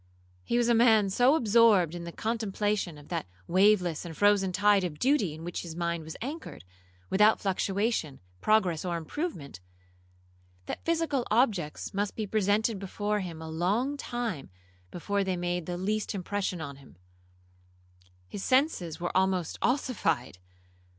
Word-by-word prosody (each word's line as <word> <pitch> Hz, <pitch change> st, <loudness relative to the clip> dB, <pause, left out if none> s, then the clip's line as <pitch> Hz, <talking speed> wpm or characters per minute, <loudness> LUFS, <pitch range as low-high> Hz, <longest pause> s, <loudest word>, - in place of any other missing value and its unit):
He 240 Hz, -, 0 dB
was 240 Hz, -1 st, +2 dB
a 240 Hz, -, +4 dB
man 220 Hz, -4 st, +4 dB
so 250 Hz, +8 st, +4 dB
absorbed 215 Hz, -, +4 dB
in 175 Hz, -1 st, -6 dB
the 170 Hz, -, -6 dB
contemplation 210 Hz, -5 st, -2 dB
of 145 Hz, -, -15 dB
that -, -, -3 dB, 0.2 s
waveless 185 Hz, -3 st, +3 dB
and 165 Hz, -3 st, -8 dB
frozen 205 Hz, -2 st, +3 dB
tide 205 Hz, +1 st, +3 dB
of 165 Hz, -5 st, -4 dB
duty 245 Hz, -, +1 dB
in 160 Hz, -, -10 dB
which 175 Hz, +1 st, -4 dB
his 165 Hz, -2 st, -8 dB
mind 170 Hz, -1 st, -2 dB
was 160 Hz, -, -8 dB
anchored, 285 Hz, -, -7 dB, 0.5 s
without 210 Hz, +3 st, +5 dB
fluctuation, 195 Hz, -, -1 dB, 0.2 s
progress, 190 Hz, -7 st, +2 dB
or 175 Hz, -2 st, -2 dB
improvement, 160 Hz, -, -5 dB, 1.1 s
that -, -, -6 dB
physical 325 Hz, -6 st, 0 dB
objects 210 Hz, -, 0 dB
must 200 Hz, +1 st, -2 dB
be 220 Hz, -, -2 dB
presented 210 Hz, +1 st, +1 dB
before 205 Hz, +2 st, -2 dB
him 170 Hz, -4 st, -6 dB
a -, -, -7 dB
long 200 Hz, -, 0 dB
time 240 Hz, -, -4 dB, 0.4 s
before 200 Hz, -, -1 dB
they 190 Hz, -1 st, -1 dB
made 175 Hz, -1 st, -2 dB
the 175 Hz, -1 st, -3 dB
least 210 Hz, +3 st, -2 dB
impression 190 Hz, -2 st, -3 dB
on 140 Hz, -3 st, -7 dB
him,—his 90 Hz, -, -16 dB
senses 255 Hz, -, +1 dB
were 175 Hz, -, -3 dB
almost 185 Hz, -3 st, +1 dB
ossified. 165 Hz, -, 0 dB
190 Hz, 145 wpm, -29 LUFS, 160-215 Hz, 1.1 s, without